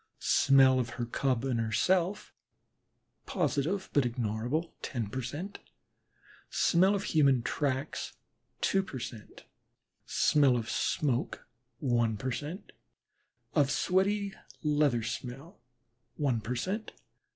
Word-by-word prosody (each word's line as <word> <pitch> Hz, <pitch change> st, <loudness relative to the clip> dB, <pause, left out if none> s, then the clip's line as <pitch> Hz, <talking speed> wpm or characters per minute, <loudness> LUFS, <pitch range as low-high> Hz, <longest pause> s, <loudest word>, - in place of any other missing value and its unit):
smell 135 Hz, -1 st, +5 dB
of 120 Hz, -1 st, -1 dB
her 120 Hz, -, -1 dB
Cub 130 Hz, +1 st, 0 dB
and 125 Hz, -3 st, 0 dB
herself, 180 Hz, -, +1 dB, 0.9 s
positive 170 Hz, +7 st, 0 dB
but 145 Hz, -, +4 dB
ignorable, 120 Hz, +6 st, -2 dB
ten 115 Hz, -6 st, -3 dB
per 130 Hz, -, -2 dB
cent.; 150 Hz, -, -6 dB, 0.9 s
smell 190 Hz, +4 st, +3 dB
of 200 Hz, -, -2 dB
human 140 Hz, -, +3 dB
tracks, 140 Hz, +1 st, -2 dB, 0.5 s
two 195 Hz, -, +3 dB
per 190 Hz, -8 st, -7 dB
cent.; 115 Hz, -3 st, -8 dB, 0.6 s
smell 140 Hz, -4 st, +4 dB
of 115 Hz, -1 st, -3 dB
smoke, 130 Hz, -5 st, -1 dB, 0.3 s
one 120 Hz, -5 st, +1 dB
per 130 Hz, +4 st, -3 dB
cent.; 150 Hz, -, -6 dB, 0.8 s
of 145 Hz, -4 st, +3 dB
sweaty 200 Hz, +4 st, +1 dB, 0.3 s
leather 145 Hz, -6 st, +2 dB
smell, 130 Hz, -, -6 dB, 0.5 s
one 130 Hz, -6 st, 0 dB
per 120 Hz, +4 st, -3 dB
cent. 195 Hz, -, -3 dB
135 Hz, 110 wpm, -30 LUFS, 120-170 Hz, 0.9 s, smell